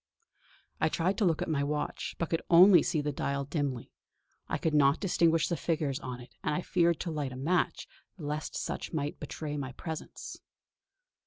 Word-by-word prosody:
I 155 - +3
tried 175 +5 0
to 210 - +3
look 165 -3 +2
at - - -5
my 150 -4 0
watch, 150 +1 -3
but 170 - -2
could 165 - +1
only 180 +2 +8
see 155 - 0
the 150 0 -1
dial 140 0 -2
dimly; 140 -5 -3 0.6
I - - -1
could 160 - -1
not 145 0 +4
distinguish 165 -4 +3
the 170 - 0
figures 150 -5 -1
on 125 -3 -6
it 120 - -13
and - - 0
I 180 - -1
feared 170 -2 +2
to 170 - -3
light 145 -4 -2
a - - -7
match 170 +7 0 0.3
lest 150 -2 -4
such - - -4
might 145 -2 -2
betray 150 0 -5
my 135 -2 -4
presence. 160 +4 -7
150 Hz, 185 wpm, -30 LUFS, 140-170 Hz, 0.6 s, only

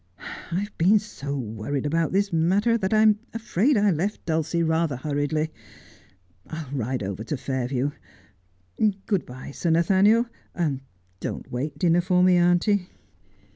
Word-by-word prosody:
I 175 +3 -5
have 205 +1 -7
been 190 +6 +5
so 145 -9 -5
worried 115 +4 -3
about 165 +2 +1
this 200 0 +1
matter 195 +8 +3
that 190 -4 -1
I'm 215 -1 +5 0.2
afraid 230 +3 +1
I 205 -1 +4
left 185 +6 -2
Dulcie 165 +1 0
rather 160 -2 +1
hurriedly. 150 +3 -1 1.0
I'll 155 -4 -7
ride 125 -2 -2
over 100 +2 -4
to 145 - -3
Fair 130 -1 -2
view. 135 +2 -1 1.1
Good 200 -5 0
bye, 125 +2 -9
Sir 170 - -2
Nathaniel. 195 +8 +4 0.9
Don't - - -5
wait 140 +4 -3
dinner 170 +2 +3
for 180 0 +2
me, 185 0 +5
auntie.' 175 +2 +2
165 Hz, 140 wpm, -25 LUFS, 140-195 Hz, 1.1 s, been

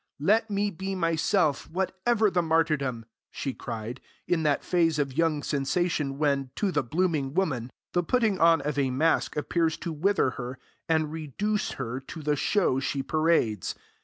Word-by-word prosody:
'Let 215 +9 +3
me 205 0 0
be 190 +2 -4
myself, 165 -3 +1
whatever 190 +5 +1
the 175 - +2
martyrdom!' 155 -8 0 0.2
she 135 - -4
cried, 115 +2 -6 0.3
in 175 -2 +1
that 150 -2 +1
phase 165 -3 +2
of 140 -3 -1
young 155 -2 +1
sensation 145 0 0
when, 140 -3 +1
to 200 -3 0
the 150 - +1
blooming 150 0 -1
woman; 135 -10 0 0.2
the 175 - +3
putting 215 +1 +1
on 165 -2 +5
of 145 0 -2
a 135 -2 +2
mask 150 +4 +1
appears 160 +1 0
to 170 -1 -4
wither 165 -3 +2
her 125 +1 -6 0.3
and 160 -2 +2
reduce 180 - -2
her 125 -1 -4
to 150 +4 -9
the 150 0 +1
show 145 -3 +1
she 135 0 -2
parades. 155 - +1
160 Hz, 160 wpm, -27 LUFS, 140-180 Hz, 0.3 s, on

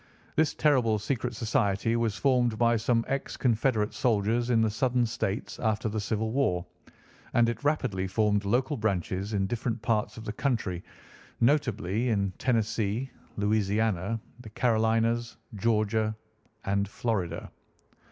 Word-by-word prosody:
This 160 -1 +2
terrible 125 -8 +3
secret 125 +2 -2
society 115 -2 +1
was 115 -3 0
formed 125 -5 +2
by 120 0 +3
some 115 +1 +1
ex 135 0 -3
Confederate 115 -3 +1
soldiers 115 +1 +1
in 120 -2 +4
the 110 - +3
Southern 125 +1 +1
states 110 -3 -3
after 110 -1 0
the 110 +1 -2
Civil 110 +1 -1
War, 95 -10 +1 0.7
and 120 -1 +5
it 115 +1 -3
rapidly 100 -11 0
formed 105 +1 +1
local 125 +8 +1
branches 100 -2 -1
in 100 -2 +1
different 115 +2 -2
parts 105 0 0
of 110 - -8
the 105 - -3
country, 110 -9 -1 0.6
notably 120 - +1
in 100 -4 0
Tennessee, 115 +1 0 0.3
Louisiana, 105 0 +1 0.2
the 120 -3 -10
Carolinas, 115 +1 +1 0.2
Georgia, 110 0 +1 0.5
and 100 +1 +1
Florida. 95 -6 -3
110 Hz, 135 wpm, -28 LUFS, 105-120 Hz, 0.7 s, and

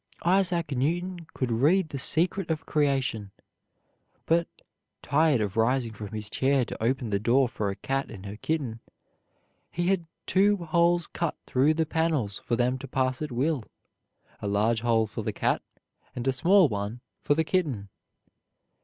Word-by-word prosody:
Isaac 180 -3 +2
Newton 170 +6 -1
could 130 -2 -1
read 155 +9 +3
the 140 - -5
secret 175 +5 +1
of 160 0 -2
creation; 135 -8 0 1.0
but, 170 +1 +2 0.6
tired 145 -3 +3
of 105 -2 -2
rising 115 0 +1
from 105 0 -7
his 105 0 -5
chair 135 +3 +1
to - - -7
open 120 -1 0
the 100 - +1
door 125 +5 +3
for 105 -3 -3
a 100 - -3
cat 135 +5 -2
and 100 -3 -10
her 100 +1 -6
kitten, 130 -4 -2 0.9
he 175 +1 -1
had 180 -4 0 0.2
two 205 +2 +3
holes 170 0 +2
cut 170 -2 -3
through 140 +5 +2
the 160 0 +1
panels 155 -10 0
for 120 - 0
them 125 +2 +1
to 135 - -8
pass 130 +1 -1
at 150 -3 -3
will, 135 +2 0 0.8
a 105 - -3
large 110 +3 +1
hole 115 -2 +2
for - - -6
the - - -2
cat, - - 0 0.5
and 125 +1 -4
a 135 - +3
small 180 +7 +5
one 105 +1 -4 0.2
for 145 - +2
the 160 - +2
kitten. 150 - -1
135 Hz, 165 wpm, -27 LUFS, 115-165 Hz, 1.0 s, small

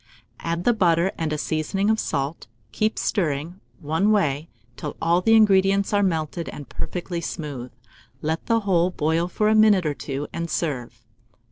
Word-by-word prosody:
Add 170 +1 -2
the 240 - +4
butter 175 -3 +2
and 160 -2 -2
a 155 - -1
seasoning 165 +7 0
of 220 - +1
salt, 140 0 -3 0.2
keep 215 +1 0
stirring 165 -2 -1 0.2
one 160 +8 +1
way 160 -6 +1 0.3
till 150 - -6
all 170 +2 +2
the 225 +3 +4
ingredients 195 -2 +4
are 205 - +4
melted 165 -3 -1
and 145 -3 -8
perfectly 175 +3 -4
smooth; 140 -7 -5 0.5
let 160 +3 -3
the 230 -1 +2
whole 180 -3 +2
boil 165 0 0
for 210 +4 0
a 215 - +4
minute 215 -4 +5
or 150 - +1
two, 140 0 -5
and 170 0 -3
serve. 125 -8 -3
170 Hz, 165 wpm, -24 LUFS, 150-195 Hz, 0.5 s, minute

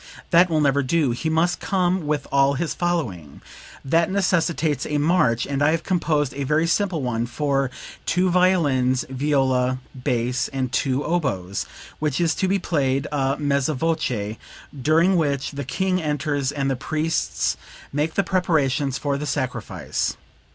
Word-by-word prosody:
That 175 +1 +6
will 155 -2 +2
never 140 -1 +3
do; 145 0 +1
he 140 +7 -2
must 165 +2 +1
come 180 -3 0
with 150 -2 -1
all 140 0 +3
his 165 +4 -2
following. 110 - -2 0.5
That 165 +4 +2
necessitates 170 -6 +1
a 150 - -1
march, 145 -7 +2
and 140 0 -2
I 145 - +5
have 165 0 0
composed 150 -7 0
a 140 +1 -3
very 150 +4 +2
simple 170 -3 0
one 120 -1 -1
for 135 +1 0 0.4
two 180 0 +2
violins, 145 -9 +2
viola, 130 -2 +1 0.2
bass 125 0 -1
and 130 -3 -3
two 130 +1 0
oboes, 100 - -1 0.3
which 150 -3 -1
is 165 -3 +2
to 190 - +2
be 195 +2 +2
played 140 -7 0
a 135 -1 0
mezza 145 0 0
voce, 125 -9 -1 0.4
during 165 +7 +3
which 140 -3 0
the 140 -1 -5
King 185 +5 0
enters 145 -2 -1
and 140 -1 -2
the - - 0
priests 155 +5 -1 0.4
make 150 +3 -1
the 200 - +2
preparations 150 -7 +1
for 140 -1 -1
the 150 - -4
sacrifice. 130 -4 -2
145 Hz, 155 wpm, -23 LUFS, 130-165 Hz, 0.5 s, That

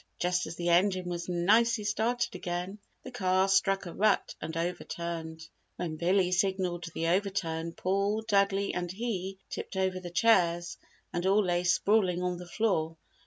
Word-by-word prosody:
Just 180 0 0
as 165 - -6
the 175 0 -2
engine 185 +1 +3
was 175 0 -4
nicely 215 +6 +3
started 235 +4 0
again, 180 +2 -4 0.2
the - - -8
car 190 -5 +2
struck 195 0 +2
a 170 - -7
rut 210 0 +2
and 160 0 -5
overturned. 165 -2 -4 0.3
When 165 -3 -4
Billy 180 +3 +2
signalled 185 -2 0
the 165 - -1
overturn, 170 -3 -1
Paul, 200 +4 0
Dudley 200 -2 +1
and 175 -1 -3
he, 195 -3 -4
tipped - - -5
over 190 -1 0
the 180 -1 -7
chairs 175 -3 +2 0.3
and 175 - -1
all 205 +2 +4
lay 175 0 +1
sprawling 180 0 +2
on 180 -1 -1
the 180 - -9
floor. 165 -7 0
185 Hz, 160 wpm, -29 LUFS, 175-200 Hz, 0.3 s, all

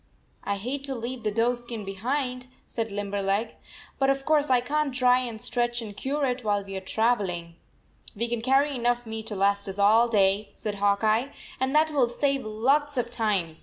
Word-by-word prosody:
" - - -38
I 200 - -1
hate 255 +8 -4
to 270 -1 -4
leave 240 +1 -5
the 215 - 0
doe 230 +3 +2
skin 240 -3 -6
behind," 250 +6 -2 0.2
said 225 -2 -3
Limberleg, 200 +2 -1 0.2
" - - -20
but 270 0 +3
of 275 0 0
course 300 -2 +3
I 255 -1 +5
can 290 +3 -1
t 255 - -4
dry 250 -1 +5
and 235 -3 -5
stretch 240 +1 0
and 215 -3 -7
cure 280 +7 -1
it 250 -1 -2
while 205 -2 +1
we 195 0 -8
are 190 - -3
travel 220 +1 +1
ing." 170 -1 -5 0.6
"We 230 +3 -1
can 235 -1 -2
carry 270 +3 +2
enough 240 0 0
meat 220 0 -6
to 210 - -4
last 200 +1 +1
us 195 0 -6
all 220 +4 +5
day," 200 -2 +2
said 210 -2 -4
Hawk 200 +1 +2
Eye, 225 +6 +2 0.3
"and 265 +2 0
that 310 +1 +4
will 265 -5 +2
save 275 +2 0
lots 270 +7 +1
of 240 -1 -1
time. 195 -9 -1
235 Hz, 215 wpm, -26 LUFS, 205-260 Hz, 0.6 s, I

